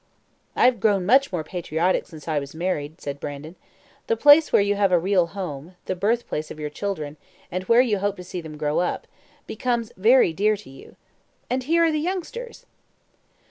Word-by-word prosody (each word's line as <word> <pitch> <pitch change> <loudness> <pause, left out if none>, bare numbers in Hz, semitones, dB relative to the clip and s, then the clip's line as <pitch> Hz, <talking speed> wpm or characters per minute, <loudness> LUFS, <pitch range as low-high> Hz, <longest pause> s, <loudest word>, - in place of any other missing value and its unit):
"I - - +4
have 250 -3 +4
grown 195 -3 +2
much 265 +6 +4
more 175 -4 -2
patriotic 170 +2 -1
since 160 -2 -13
I 155 -2 +1
was 140 +2 -9
married," 160 -3 -3
said 140 0 -6
Brandon. 145 +4 -7 0.5
"The 460 - +1
place 295 +2 +6
where - - +5
you 200 0 +1
have 200 -2 +1
a 180 - +5
real 180 0 +2
home 175 -3 -7
the 185 - -2
birthplace 200 -5 -1
of 155 - -9
your 150 -1 -4
children 155 -5 -4 0.3
and 185 +1 -3
where 230 +4 +5
you 220 -6 +1
hope 205 0 -1
to 180 - -8
see 180 0 -6
them 155 -2 -9
grow 150 0 0
up 175 - -2 0.4
becomes 235 0 -2
very 220 -2 +4
dear 210 +5 +2
to 200 -9 -14
you. 135 - -14 0.6
And 255 +1 0
here 330 +6 +2
are 330 - +3
the 305 - 0
youngsters!" 385 +9 -5
190 Hz, 195 wpm, -23 LUFS, 160-235 Hz, 0.6 s, place